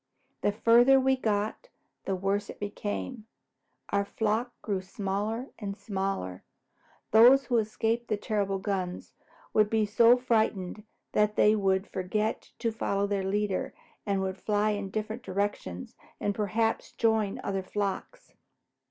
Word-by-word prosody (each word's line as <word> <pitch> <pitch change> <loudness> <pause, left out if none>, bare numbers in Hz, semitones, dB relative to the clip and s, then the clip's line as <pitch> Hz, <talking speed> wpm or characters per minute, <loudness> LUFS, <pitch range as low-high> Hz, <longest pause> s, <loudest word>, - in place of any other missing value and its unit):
The 205 - +2
farther 240 +5 +5
we 265 0 +3
got, 215 - -1 0.4
the 195 - 0
worse 195 +2 -1
it - - -9
became. 210 +3 -4 0.6
Our 200 0 +1
flock 220 +4 -1
grew 200 -3 -1
smaller 205 +6 -3
and 200 -2 -5
smaller. 190 - -3 0.7
Those 245 +5 +7
who 240 -2 +2
escaped 225 +2 -1
the 215 - 0
terrible 200 -2 -1
guns 190 -2 -3 0.4
would 215 -1 +4
be 220 -1 +2
so 230 +4 +5
frightened 220 -5 0 0.3
that 210 0 +2
they 210 +1 +5
would 195 -1 +1
forget 210 +4 -2
to 230 -1 -1
follow 200 -2 -1
their 200 -1 -1
leader 200 0 -1 0.3
and 200 -2 0
would 190 0 -3
fly 210 0 +1
in 205 -2 -3
different 215 +3 -4
directions 190 - -3 0.2
and - - -1
later 210 0 -1
perhaps 225 +3 -1
join 220 -3 +1
other 195 -1 -1
flocks. 205 - -4
210 Hz, 140 wpm, -29 LUFS, 195-225 Hz, 0.7 s, Those